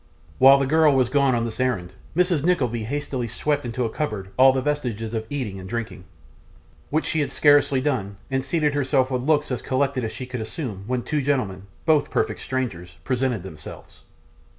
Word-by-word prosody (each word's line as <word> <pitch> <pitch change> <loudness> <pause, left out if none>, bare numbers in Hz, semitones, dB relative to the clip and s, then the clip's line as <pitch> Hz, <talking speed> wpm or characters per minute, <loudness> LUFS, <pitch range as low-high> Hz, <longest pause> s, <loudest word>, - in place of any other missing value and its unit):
While 135 +1 +8
the 140 - +1
girl 155 0 +4
was 130 -2 +3
gone 140 -3 +3
on 115 -1 0
this 110 0 -6
errand, 110 -9 -1 0.2
Mrs. 175 -4 +2
Nickleby 125 -10 +1
hastily 130 -1 -3
swept 145 +5 -1
into 120 +1 -2
a - - -1
cupboard 105 -11 -4
all 130 +1 +7
vestiges 130 -5 -2
of 110 -1 -3
eating 120 -9 -4
and 95 0 -9
drinking; 110 -5 -5 0.8
which 155 +2 0
she 160 - 0
had 140 -3 -1
scarcely 145 -2 +4
done, 110 -9 -2
and 135 0 0
seated 150 0 0
herself 135 -2 +1
with 125 -1 0
looks 150 +1 +1
as 125 - -2
collected 135 -1 0
as 110 - -2
she 130 - -6
could 125 -2 -5
assume, 110 - -5
when 125 -1 -1
two 150 -2 -1
gentlemen, 105 -9 -1 0.2
both 155 -3 +3
perfect 110 -1 -1
strangers, 90 -11 -4
presented 125 -4 -1
themselves. 75 -5 -11
130 Hz, 185 wpm, -23 LUFS, 110-145 Hz, 0.8 s, While